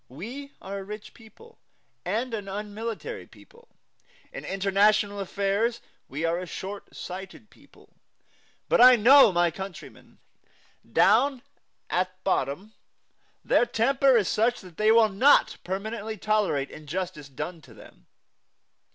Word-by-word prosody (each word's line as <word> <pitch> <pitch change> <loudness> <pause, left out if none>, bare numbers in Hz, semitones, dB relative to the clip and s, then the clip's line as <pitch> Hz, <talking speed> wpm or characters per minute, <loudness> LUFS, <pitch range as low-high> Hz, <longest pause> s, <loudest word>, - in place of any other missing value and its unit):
We 245 - -9
are 195 +1 -5
a - - -7
rich 210 +2 -9
people, 455 - -18 0.4
and 230 +7 -2
an 205 -3 -4
unmilitary 215 - -6
people. 475 +1 -20 0.7
In - - -7
international 200 +1 +1
affairs 200 +4 -1 0.3
we 150 +5 -3
are 165 +1 0
a 180 - -7
short 195 +3 -8
sighted 190 +3 -9
people. - - -22 0.7
But - - +3
I 250 0 +9
know 245 +1 +7
my 175 -1 +2
countrymen. 190 +2 -10 0.7
Down 275 -3 +3 0.4
at 185 +1 -2
bottom 190 +3 -2 0.7
their 240 - +3
temper 265 +2 +3
is 210 - +1
such 235 +3 +1
that 180 -4 -15
they 215 +1 +4
will 225 -1 +5
not 255 +9 +4
permanently 215 +3 -5
tolerate 205 -10 0
injustice 155 -1 -6
done 155 +5 -6
to - - -17
them. - - -17
205 Hz, 125 wpm, -26 LUFS, 185-230 Hz, 0.7 s, I